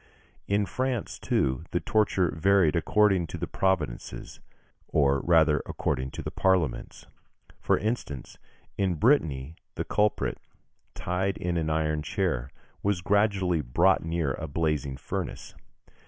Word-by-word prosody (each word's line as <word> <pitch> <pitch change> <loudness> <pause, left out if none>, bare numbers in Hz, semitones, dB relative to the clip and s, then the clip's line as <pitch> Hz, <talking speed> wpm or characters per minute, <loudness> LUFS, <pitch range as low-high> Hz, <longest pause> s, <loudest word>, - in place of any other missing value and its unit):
In 100 +1 +2
France, 130 +3 -3
too, 65 +3 0
the 90 - 0
torture 100 -5 +1
varied 90 -1 +3
according 95 +1 +3
to - - -6
the - - -3
provinces, 95 -10 -2 0.5
or 70 -2 +2
rather 80 -2 +4
according 65 +1 -2
to - - -4
the - - -4
parliaments. 90 -9 0 0.5
For - - +2
instance, 105 - -4 0.4
in 95 -3 +1
Brittany 80 - +1 0.2
the - - -3
culprit, 105 0 0 0.6
tied 95 +2 -1
in 90 -3 -2
an 80 -2 0
iron 75 -1 0
chair, 85 - -1 0.3
was 100 -3 0
gradually 95 -4 +2
brought 85 +9 +3
near 80 -3 -1
a 80 - -5
blazing 75 -3 -1
furnace. - - -5
85 Hz, 125 wpm, -27 LUFS, 75-100 Hz, 0.6 s, rather